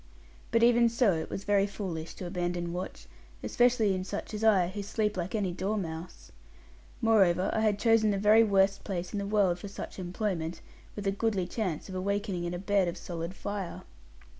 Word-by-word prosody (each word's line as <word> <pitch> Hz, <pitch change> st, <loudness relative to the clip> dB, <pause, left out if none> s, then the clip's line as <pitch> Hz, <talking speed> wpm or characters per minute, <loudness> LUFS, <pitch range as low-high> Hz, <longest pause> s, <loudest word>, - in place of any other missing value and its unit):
But 230 Hz, 0 st, +3 dB
even 235 Hz, 0 st, +5 dB
so, 235 Hz, -4 st, +3 dB
it 160 Hz, -1 st, -3 dB
was 195 Hz, -, -5 dB
very 200 Hz, -1 st, +3 dB
foolish 175 Hz, -6 st, -5 dB
to 185 Hz, -, -7 dB
abandon 175 Hz, -1 st, -2 dB
watch, 180 Hz, +1 st, -6 dB, 0.4 s
especially 240 Hz, -4 st, +3 dB
in 185 Hz, 0 st, -2 dB
such 200 Hz, +3 st, -5 dB
as 210 Hz, +1 st, -4 dB
I, 195 Hz, -6 st, +4 dB
who 205 Hz, +2 st, -5 dB
sleep 210 Hz, +1 st, -1 dB
like 185 Hz, +3 st, -3 dB
any 200 Hz, -4 st, 0 dB
dormouse. 180 Hz, -3 st, -4 dB, 0.7 s
Moreover, 195 Hz, -5 st, +4 dB
I -, -, +1 dB
had 215 Hz, -2 st, +2 dB
chosen 225 Hz, 0 st, +4 dB
the 200 Hz, -, +1 dB
very 210 Hz, +3 st, +6 dB
worst 195 Hz, -2 st, +2 dB
place 180 Hz, -2 st, -4 dB
in 205 Hz, -, -1 dB
the 200 Hz, -, -3 dB
world 200 Hz, -4 st, +2 dB
for 200 Hz, -, -7 dB
such 200 Hz, -, -8 dB
employment, 175 Hz, -2 st, -3 dB, 0.4 s
with 205 Hz, -, -6 dB
a 195 Hz, -, +2 dB
goodly 200 Hz, -2 st, 0 dB
chance 180 Hz, -4 st, -3 dB
of 190 Hz, -, -8 dB
awakening 195 Hz, -1 st, -2 dB
in 175 Hz, -, -3 dB
a -, -, -3 dB
bed 195 Hz, 0 st, +1 dB
of 175 Hz, +1 st, -3 dB
solid 170 Hz, +1 st, -5 dB
fire. 200 Hz, -3 st, -5 dB
195 Hz, 190 wpm, -29 LUFS, 180-210 Hz, 0.7 s, very